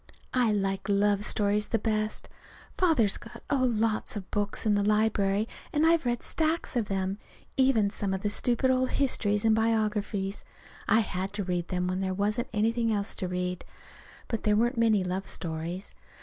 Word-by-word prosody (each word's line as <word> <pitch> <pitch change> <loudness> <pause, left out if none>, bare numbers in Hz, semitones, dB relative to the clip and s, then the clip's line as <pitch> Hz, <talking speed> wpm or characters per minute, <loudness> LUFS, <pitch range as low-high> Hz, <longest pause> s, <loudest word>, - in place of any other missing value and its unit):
I 245 -4 +3
like 195 0 -1
love 200 0 +2
stories 210 0 +1
the 225 - +1
best. 215 0 -1 0.5
Father's 305 - +3
got - - -12
oh, 255 -3 +3
lots 220 -1 0
of 195 -3 -7
books 205 +1 -2
in 215 - +3
the 205 - +2
library, 210 -1 +2 0.2
and 305 +1 +2
I've 330 -5 +3
read 240 -1 -1
stacks 320 -2 -1
of 235 -3 +1
them, 195 0 -2 0.4
even 250 -7 +3
some 200 -2 -1
of 190 0 -3
the 205 - +1
stupid 245 +4 +2
old 255 0 +1
histories 210 -6 +1
and 220 -1 +5
biographies. 210 -3 0 0.4
I 220 +3 +5
had 190 -1 -3
to 205 -1 -2
read 175 -2 -2
them 180 -1 -1
when 185 +1 -1
there 190 -1 -1
wasn't 210 +4 -1
anything 230 +2 +1
else 205 -1 0
to 185 - -2
read. 180 0 -3 0.6
But 225 - -2
there 210 -1 +2
weren't 240 +4 +2
many 225 -4 +3
love 185 +2 -3
stories. 170 +3 -4
210 Hz, 175 wpm, -28 LUFS, 195-230 Hz, 0.6 s, and